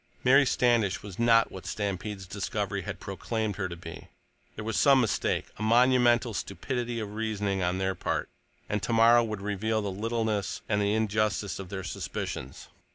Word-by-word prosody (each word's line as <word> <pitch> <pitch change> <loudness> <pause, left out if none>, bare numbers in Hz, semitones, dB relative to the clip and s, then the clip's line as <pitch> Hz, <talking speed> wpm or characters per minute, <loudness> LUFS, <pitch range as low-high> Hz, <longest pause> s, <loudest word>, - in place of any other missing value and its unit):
Mary 135 +2 +6
Standish 120 -7 +2
was 100 -1 -9
not 115 -1 +4
what 95 - -9
Stampede's 100 -1 -3
discovery - - -3
had - - -6
proclaimed 110 -4 -3
her 95 -2 -2
to 85 - -6
be; 85 -1 -10 0.5
there 105 - -6
was 110 -1 -2
some 140 -2 +5
mistake, 115 -5 0
a - - -9
monumental 120 +1 +4
stupidity 120 +4 -3
of 105 -2 -5
reasoning 105 -3 -1
on 90 +1 0
their 95 0 0
part, 95 - -2 0.4
and 105 -1 -1
tomorrow 115 +3 +5
would 110 -3 -4
reveal 105 +2 -1
the 100 -2 -2
littleness 110 0 -2
and 105 -1 +1
the 100 +1 +1
injustice 110 -2 0
of 95 -2 -7
their 95 -1 -5
suspicions. 65 -6 -5
105 Hz, 165 wpm, -28 LUFS, 100-115 Hz, 0.5 s, Mary